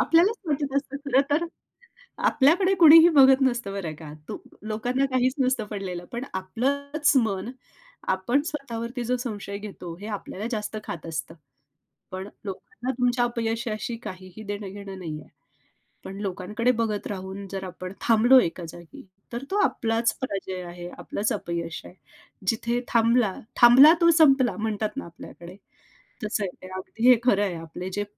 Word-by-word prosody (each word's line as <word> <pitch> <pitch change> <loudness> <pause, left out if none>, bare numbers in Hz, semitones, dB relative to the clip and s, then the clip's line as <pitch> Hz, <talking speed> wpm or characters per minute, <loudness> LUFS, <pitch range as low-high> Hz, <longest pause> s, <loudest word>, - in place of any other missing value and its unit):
आपल्यालाच 360 +8 +4
वाटत 285 -2 -1
असतं 280 0 -2
खरं 275 -1 +3
तर 310 +4 +2 0.8
आपल्याकडे 350 +8 +4
कुणीही 325 +1 +10
बघत 265 0 +7
नसतं 240 -6 0
बरं 180 -6 -4
का. 155 -2 -9 0.2
तू - - -4 0.3
लोकांना 245 +5 0
काहीच 255 0 +2
नसतं 255 -4 +1
पडलेलं. 185 -4 -5
पण 240 +3 -4
आपलंच 280 +10 0
मन, 195 +1 -3 0.6
आपण 240 +10 0
स्वतःवरती 245 -4 -4
जो 250 +2 0
संशय 205 -5 -5
घेतो 195 -5 -8
हे 205 - -7
आपल्याला 205 +4 -7
जास्त 215 0 -3
खात 165 0 -6
असतं. 160 0 -5 0.8
पण 185 +1 -6 0.2
लोकांना 245 - -6
तुमच्या 245 0 +2
अपयशाशी 230 -1 -2
काहीही 185 +3 -9
देणं 205 -1 -5
घेणं 200 -1 -8
नाहीये. 155 -4 -7 0.8
पण 195 +1 -7
लोकांकडे 210 +5 -1
बघत 220 -4 -2
राहून 195 0 -6
जर 195 -1 -4
आपण 185 0 -7
थांबलो 240 +3 +6
एका 175 -3 -2
जागी 170 +1 -12 0.3
तर 240 +3 -4
तो 400 - +1
आपलाच 225 -2 +1
पराजय 190 -6 -4
आहे, 175 0 -8
आपलंच 210 +1 -2
अपयश 170 -1 -4
आहे. - - -12 0.5
जिथे 235 +3 0
थांबला 230 -3 +3 0.3
थांबला 260 +7 +9
तो 335 - +6
संपला 265 -8 +5
म्हणतात 215 +2 -2
ना - - -4
आपल्याकडे. 170 +1 -12 0.7
तसं 210 -1 -1
आहे 185 - -3
ते. 185 - -9
अगदी 225 +6 +1
हे 250 - +9
खरं 205 -5 +3
आहे. 185 -4 -2
आपले 165 +3 -7
जे 205 - -1
220 Hz, 150 wpm, -25 LUFS, 190-255 Hz, 0.8 s, कुणीही